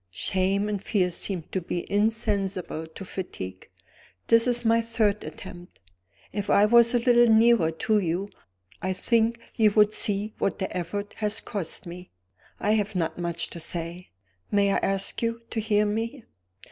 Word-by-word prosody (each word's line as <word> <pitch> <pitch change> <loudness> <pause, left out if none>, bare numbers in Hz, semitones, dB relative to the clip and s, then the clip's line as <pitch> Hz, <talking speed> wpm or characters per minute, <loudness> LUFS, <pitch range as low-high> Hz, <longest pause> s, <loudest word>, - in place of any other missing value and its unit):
Shame 190 - 0
and 205 -2 -2
fear 185 -3 0
seemed 175 -1 -2
to 190 - -1
be 175 0 -4
insensible 200 -6 -1
to 160 +5 -10
fatigue. 95 - -7 0.6
This 230 +1 +5
is 240 -1 +1
my 230 +1 +4
third 220 -3 0
attempt. 175 -2 -10 0.5
If 205 0 -3
I 205 - +5
was 235 +2 +5
a - - +6
little 240 -1 +4
nearer 225 -6 +5
to 210 +6 +1
you, 185 +2 -2 0.5
I 185 - -1
think 230 +4 +1
you 220 -2 +4
would 210 0 +4
see 210 +1 0
what - - 0
the 190 - -4
effort 200 +4 -4
has 210 0 0
cost 190 -6 -4
me. 180 +1 -9 0.5
I 210 - +1
have 210 -1 0
not 165 -1 -2
much 170 -1 -2
to 170 - -7
say. 170 +2 -4 0.4
May 200 -1 +2
I - - +2
ask 195 0 0
you 230 0 -2
to 225 - -2
hear 210 -1 +2
me?" 225 +4 -3
205 Hz, 165 wpm, -26 LUFS, 180-220 Hz, 0.6 s, a